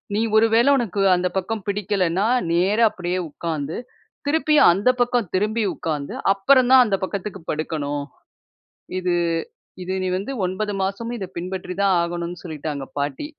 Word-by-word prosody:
"நீ 215 - +1 0.2
ஒருவேள 225 +3 +4
உனக்கு 210 -5 -1
அந்த 180 +1 0
பக்கம் 210 +2 -3
பிடிக்கலன்னா, 195 -2 0 0.3
நேரா 200 +7 +3
அப்டியே 180 0 -3
உட்கார்ந்து, 155 -1 -4 0.5
திருப்பி 305 0 +2 0.2
அந்த 200 +8 +2
பக்கம் 245 -5 +1
திரும்பி 215 +3 +1
உட்கார்ந்து, 150 -3 -4 0.2
அப்பறம் 255 +5 +4
தான் 255 -1 +9
அந்த 200 -2 0
பக்கத்துக்கு 195 0 -4
படுக்கணும். 145 -2 -3 1.0
இது, 180 -1 0 0.7
இது 185 - -3
நீ 185 - -1
வந்து 205 +8 -5 0.2
9 205 +3 -3
மாசமும் 230 +5 -3
இத 190 - -4
பின்பற்றி 180 +1 -5
தான் 195 -2 +4
ஆகணும்னு" 175 0 -4
சொல்லிட்டாங்க 150 -4 -5
பாட்டி. 145 - -3
190 Hz, 140 wpm, -22 LUFS, 170-215 Hz, 1.0 s, தான்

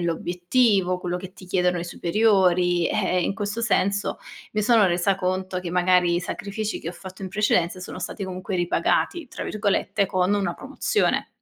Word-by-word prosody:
l'obiettivo, 180 +3 +1
quello 180 0 -3
che 185 0 -8
ti 185 - -14
chiedono 180 -1 +1
i 170 - -4
superiori. 180 -2 +2
Eh, 180 0 +1
in 195 - -1
questo 205 +3 -3
senso, 200 -3 0 0.3
mi 210 0 0
sono 225 -3 +5
resa 180 +2 +2
conto 185 0 -2
che 175 -2 -5
magari 180 -1 +3
i - - 0
sacrifici 205 +3 -4
che 165 - -5
ho - - -5
fatto 190 +2 -11
in 190 - -4
precedenza, 185 -3 +1
sono 185 - -7
stati 190 +2 -4
comunque 185 0 -4
"ripagati" 270 - 0
tra - - -6
virgolette, 205 -1 0
con 185 +1 +1
una 195 -4 -1
promozione. 285 +9 0
185 Hz, 175 wpm, -24 LUFS, 180-205 Hz, 0.3 s, sono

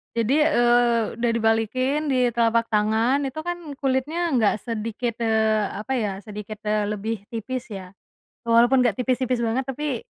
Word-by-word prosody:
Jadi, 235 +6 +2
eee, 240 -4 +3
udah 240 0 +1
dibalikin, 245 +7 +1
di 250 -3 +2
telapak 230 0 +1
tangan, 220 +6 +2
itu 265 - -8
kan 345 -5 -5
kulitnya 290 +6 -1
nggak 220 -4 +1
sedikit, 230 +1 -4
eee, 220 -2 +2
apa 215 +6 -7
ya, 220 -6 0
sedikit, 210 -1 -7
eee, 210 -1 0
lebih 210 0 -4
tipis, 240 +3 -5
ya. 190 -4 -8 0.5
Walaupun 240 +3 +4
nggak 235 -1 0
tipis-tipis 255 -1 0
banget 235 +3 0
tapi, 270 -1 -4
235 Hz, 150 wpm, -23 LUFS, 220-260 Hz, 0.5 s, Walaupun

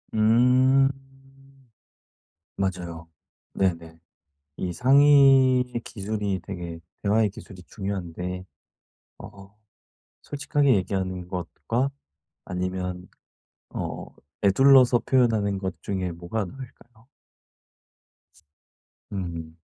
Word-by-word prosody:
음. 125 +5 +4 1.7
맞아요. 85 -4 -4 0.5
네네. 85 -3 -1 0.6
이 90 -1 -3
상의의 130 - +5
기술이 100 -1 -3
되게 85 -4 -7 0.2
대화의 105 +1 +3
기술이 95 -2 -12
중요한데 90 -2 -5 0.7
어 100 +1 -13 0.7
솔직하게 140 -2 +1
얘기하는 95 -2 -2
것과 115 +8 -2 0.6
아니면 90 0 -4 0.6
어 - - -5 0.4
에둘러서 125 +4 +6
표현하는 110 -6 +2
것 95 -2 -5
중에 95 -3 -3
뭐가 85 +5 -4
나을까요? 120 0 -13 2.0
음. 85 -4 -6
100 Hz, 175 characters per minute, -25 LUFS, 90-125 Hz, 2.0 s, 에둘러서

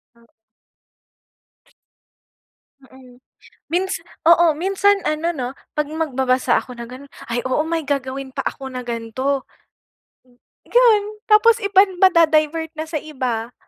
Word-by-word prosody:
Hmm. 235 0 -24 2.6
Mm, 255 -2 -18 0.5
minsa 375 +3 -1 0.3
oo. 335 -1 +6
Minsan, 390 +5 +1
ano, 310 +2 -1
'no, 255 -5 -4 0.2
'pag 300 -1 -1
magbabasa 265 -5 0
ako 250 -1 -12
na 235 - -6
gano’n, 255 +4 -12 0.2
"Ay, 235 +1 -2
oo, 260 +4 +1
may 330 0 -1
gagawin 275 -2 -3
pa 270 +1 -5
ako 270 -1 -4
na 255 -1 -7
gan'to, 240 +4 -2 0.8
hmm, 245 -1 -28 0.3
gan 470 -4 +5 0.3
tapos 455 +2 +5
iban 385 -2 +3
mada-divert 320 -3 +3
na 315 0 -5
sa 320 - -2
iba. 250 -6 -4
295 Hz, 125 wpm, -20 LUFS, 255-340 Hz, 2.6 s, oo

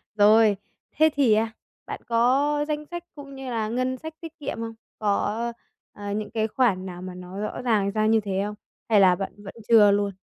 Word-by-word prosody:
Rồi, 210 0 +5 0.3
thế 315 +2 +4
thì, 270 -6 +4
a, 220 +1 +1 0.3
bạn - - -6
có 270 +6 +2
danh 300 0 -3
sách 345 +2 -7
cũng 280 -2 -10
như 265 -1 -7
là 225 -3 -1
ngân 255 +2 -1
sách 315 +4 -8
tiết 325 -1 -10
kiệm 285 -4 -4
không? 230 0 -5 0.3
Có, 215 +3 0 0.4
a, 205 0 -6
những 210 +1 -3
cái 220 -1 0
khoản 210 -6 +1
nào 180 -1 -7
mà 185 0 -7
nó 180 +2 -8
rõ 215 +3 -4
ràng 215 -5 +1
ra 215 +1 0
như 220 +1 +4
thế 195 -2 -2
không? 210 0 -5 0.3
Hay 215 -2 +5
là 185 -2 +6
bạn 195 +1 -5
vẫn 195 - -8
chưa 215 -3 +7
luôn? 200 0 +1
220 Hz, 210 wpm, -25 LUFS, 205-255 Hz, 0.4 s, chưa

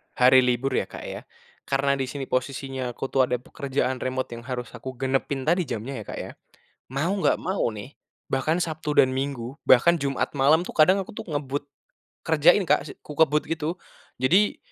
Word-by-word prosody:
Hari 130 +1 +7
libur 125 +1 +1
ya, - - 0
Kak, - - -9
ya. - - -6 0.5
Karena 140 0 +1
di 130 - -1
sini 140 +1 -5
posisinya 130 0 -3
aku 135 - -5
tuh 130 -2 +3
ada 125 - 0
pekerjaan 130 +1 -2
remote 130 -1 -3
yang 120 +1 -8
harus 125 -2 -4
aku 130 -1 -8
genepin 135 +1 -1
tadi 170 +2 +1
jamnya 120 +2 -4
ya, - - -6
Kak, - - -6
ya, - - -8 0.6
mau 150 +6 0
nggak - - +3
mau 190 +2 0
nih, 105 +7 -10 0.3
bahkan 155 +6 +1
Sabtu 155 -2 -3
dan 130 - +1
Minggu, 135 0 -4
bahkan 170 +7 +6
Jumat 140 -2 -1
malam 150 +5 +5
tuh - - -6
kadang 185 +5 +5
aku - - -11
tuh - - -8
ngebut 145 0 -3 0.5
kerjain 160 +4 +4
Kak, - - +4
se 150 - -8
kukebut 150 0 +1
gitu. 165 +2 -3 0.4
Jadi, 185 +11 +3
135 Hz, 185 wpm, -25 LUFS, 130-155 Hz, 0.6 s, Hari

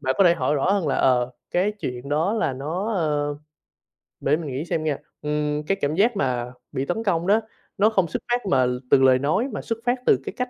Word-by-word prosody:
bạn 130 -2 0
có 195 - +6
thể 170 - +6
hỏi 155 -3 0
rõ 145 +6 +1
hơn 195 -6 0
là, - - +1
ờ, 125 -1 +2 0.2
cái 190 +4 +1
chuyện 125 +2 -5
đó 155 +7 +1
là 220 -11 0
nó, 165 - -3
ơ 150 -4 0 0.8
để 150 +3 +2
mình 155 -5 -5
nghĩ 135 +5 -3
xem 165 -2 -2
nghe, 150 -3 0 0.2
ừm, 150 0 -1
cái 195 - +1
cảm 145 +2 0
giác 220 +6 +3
mà 125 -4 -1 0.2
bị 135 - -2
tấn 200 +9 -2
công 175 -4 0
đó, 210 +3 +4 0.4
nó 210 +2 +5
không 190 -5 +1
xuất - - -4
phát 245 -2 +1
mà 135 -9 +3 0.3
từ 135 - +6
lời 130 -1 +5
nói 160 - +1
mà - - -3
xuất 230 -1 -4
phát 245 +1 +1
từ - - +4
cái - - -5
cách 250 0 -2
155 Hz, 240 wpm, -23 LUFS, 140-195 Hz, 0.8 s, có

